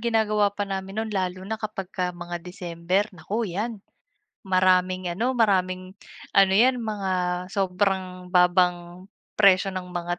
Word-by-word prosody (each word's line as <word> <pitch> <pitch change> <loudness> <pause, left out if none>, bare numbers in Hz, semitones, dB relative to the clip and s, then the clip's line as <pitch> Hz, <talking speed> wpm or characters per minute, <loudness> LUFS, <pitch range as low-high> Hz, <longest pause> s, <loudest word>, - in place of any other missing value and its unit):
ginagawa 215 -3 +2
pa 205 0 -4
namin 195 0 -5
no'n 220 -1 -2
lalo 185 -1 -2
na 220 - -2
kapagka 195 -4 -3
mga 175 -1 -7
December, 180 +2 -2
naku 210 +7 -3
'yan, 220 +3 -3 0.6
maraming 185 -1 +2
ano, 215 +9 0
maraming 185 -4 +1 0.4
ano 195 -1 +5
'yan 245 +5 +4
mga 205 -4 -2 0.4
sobrang 185 -1 -1
babang 180 0 +2 0.3
presyo 195 -1 +5
ng 180 -1 -7
mga 175 0 -3
190 Hz, 130 wpm, -25 LUFS, 180-205 Hz, 0.6 s, ano